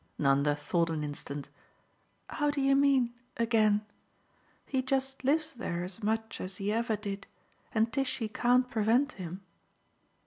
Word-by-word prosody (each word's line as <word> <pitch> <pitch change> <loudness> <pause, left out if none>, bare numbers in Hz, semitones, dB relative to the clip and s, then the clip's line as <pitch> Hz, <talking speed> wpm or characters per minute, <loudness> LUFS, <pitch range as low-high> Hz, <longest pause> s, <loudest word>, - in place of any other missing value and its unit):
Nanda 140 +1 +3
thought 165 +3 0
an 155 -2 -2
instant. 145 -1 -6 0.8
"How 295 -1 0
do 290 0 -1
you 275 0 +4
mean, 270 -4 +3 0.2
'again'? 215 -2 +3 0.8
He 265 -2 0
just 270 0 -1
lives 310 +4 +2
there 175 -8 -3
as 185 +5 -2
much 220 +1 -1
as 185 0 -5
he 200 +1 -1
ever 230 0 +1
did, 200 -1 -6 0.4
and 225 +1 +1
Tishy 260 -4 0
can't 245 +3 +3
prevent 235 +4 +2
him." 185 0 -7
225 Hz, 140 wpm, -30 LUFS, 185-260 Hz, 0.8 s, you